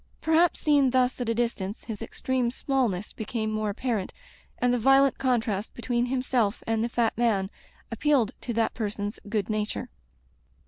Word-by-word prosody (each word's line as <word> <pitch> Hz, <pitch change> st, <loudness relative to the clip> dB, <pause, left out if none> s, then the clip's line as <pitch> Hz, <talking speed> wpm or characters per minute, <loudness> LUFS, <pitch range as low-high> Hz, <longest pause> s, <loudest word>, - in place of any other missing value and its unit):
Perhaps, 325 Hz, +2 st, +3 dB
seen 285 Hz, -3 st, +4 dB
thus 255 Hz, 0 st, +1 dB
at 240 Hz, -, -1 dB
a 230 Hz, -, +1 dB
distance, 220 Hz, -4 st, -2 dB
his 220 Hz, -2 st, -6 dB
extreme 250 Hz, +2 st, -1 dB
smallness 240 Hz, -7 st, -1 dB
became 220 Hz, 0 st, -3 dB
more 215 Hz, -1 st, -1 dB
apparent, 215 Hz, -2 st, -2 dB, 0.5 s
and 245 Hz, 0 st, +2 dB
the 245 Hz, -, +1 dB
violent 270 Hz, +3 st, +4 dB
contrast 225 Hz, -5 st, 0 dB
between 240 Hz, 0 st, 0 dB
himself 250 Hz, -4 st, 0 dB
and 225 Hz, 0 st, 0 dB
the 235 Hz, -, -1 dB
fat 235 Hz, -1 st, +1 dB
man 210 Hz, -5 st, +1 dB, 0.4 s
appealed 250 Hz, -1 st, +2 dB
to 245 Hz, -, -4 dB
that 225 Hz, -1 st, +1 dB
person's 205 Hz, -2 st, -3 dB
good 210 Hz, -3 st, 0 dB
nature. 215 Hz, -1 st, -3 dB
235 Hz, 155 wpm, -27 LUFS, 215-255 Hz, 0.5 s, seen